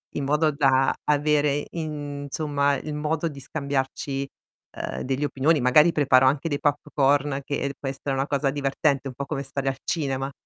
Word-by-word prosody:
in 145 - -2
modo 150 +3 +2
da 135 -2 +3
avere, 145 -1 +2
insomma, 145 -2 -2
il 150 +3 -5
modo 155 +2 -1
di 145 -3 -7
scambiarci, 140 -1 -3 0.5
ehm, - - -4
delle 135 +3 -1
opinioni, 145 +3 +2
magari 145 +6 +5
preparo 135 -4 +4
anche 140 +4 +1
dei 145 -2 -1
popcorn, 145 -1 +1
che 140 0 -2
può 135 - -3
essere 135 +1 -4
una 135 +1 -1
cosa 140 -1 +1
divertente, 140 0 0
un - - -8
po' 140 - -4
come 135 0 -3
stare 135 0 -4
al 135 - -4
cinema. 135 -3 -2
140 Hz, 165 wpm, -25 LUFS, 135-150 Hz, 0.5 s, magari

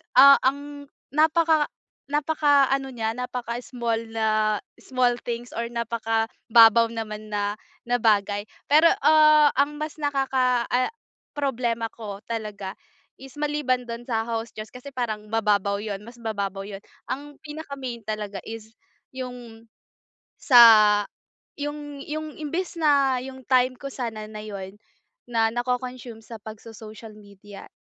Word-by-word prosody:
ah, 275 +2 +9
ang 285 +1 -4 0.2
napaka 315 +1 +3 0.4
napaka-ano 285 -2 +2
niya 225 -3 -2
napaka 250 -1 -4
small 235 -3 -2
na 215 -1 +1 0.2
small 255 -2 +1
things 240 0 -5
or 235 0 -3
napaka-babaw 230 0 +3
naman 215 -2 -6
na 205 0 -1 0.3
na 245 0 0
bagay, 205 -2 +2 0.2
pero, 310 +3 +7 0.2
ah, 305 -1 +6
ang 295 +1 +1
mas 305 0 -4
nakaka 265 -4 +1
ah, 250 +1 +2 0.5
problema 240 -5 -1
ko 210 -3 -7
talaga 210 -4 -5 0.5
is 270 +1 -12
maliban 290 -4 0
dun 235 0 -6
sa 225 -1 0
house 230 0 -3
chores 215 0 -8
kasi 250 +3 -9
parang 215 -4 -3
mababaw 205 -2 +1
yun 205 -1 -5
mas 235 +3 -13
mababaw 200 -4 -4
yun. 200 -1 -8 0.3
Ang 290 +2 -5
pinaka-main 280 -6 -6
talaga 210 -2 -4
is 225 0 -9 0.4
yung, 245 -3 -9 0.7
sa 245 -4 +8 1.0
yung 290 -1 -6
yung 310 0 -5
imbes 335 +5 -3
na 280 -4 +3
yung 260 0 -10
time 255 0 +3
ko - - -12
sana 225 -5 -5
na 215 0 -8
yun 200 -2 -8 0.5
na 225 -2 +2
nako-consume 250 -1 -4
sa 225 -3 -10
pagso-social 220 0 -11
media 205 -1 -13
240 Hz, 125 wpm, -25 LUFS, 220-275 Hz, 1.0 s, ah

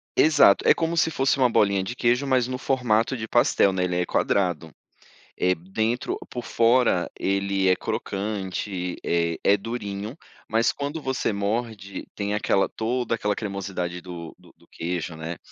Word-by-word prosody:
Exato, 150 -10 +5
é - - +8
como 165 0 -1
se 165 - +3
fosse 135 -2 +1
uma 130 -2 +4
bolinha 100 -4 +2
de 120 +6 -5
queijo, 125 +2 +2
mas 130 -3 +2
no 130 0 -3
formato 125 -2 +1
de 110 -2 -5
pastel, 120 -4 +3
né, 95 -1 -1
ele 90 -1 -1
é - - 0
quadrado. 90 -6 0 0.7
Eh, 90 0 +3
dentro 110 +8 -2
por 120 -1 -6
fora, 115 -6 +3
ele 100 0 +1
é 90 - +4
crocante, 95 -3 -3
eh, 85 -1 0
é 100 - +5
durinho, 105 0 -5 0.3
mas 115 +2 +2
quando 145 +3 -4
você 130 -5 -1
morde, 100 0 -3
tem 100 0 -2
aquela 100 -2 +2
toda 120 +1 -1
aquela 105 -2 0
cremosidade 95 -4 -4
do 85 -2 -8
do - - -19
do - - -25
queijo, 85 -1 -4
né, 80 +2 -5
105 Hz, 160 wpm, -25 LUFS, 95-120 Hz, 0.7 s, é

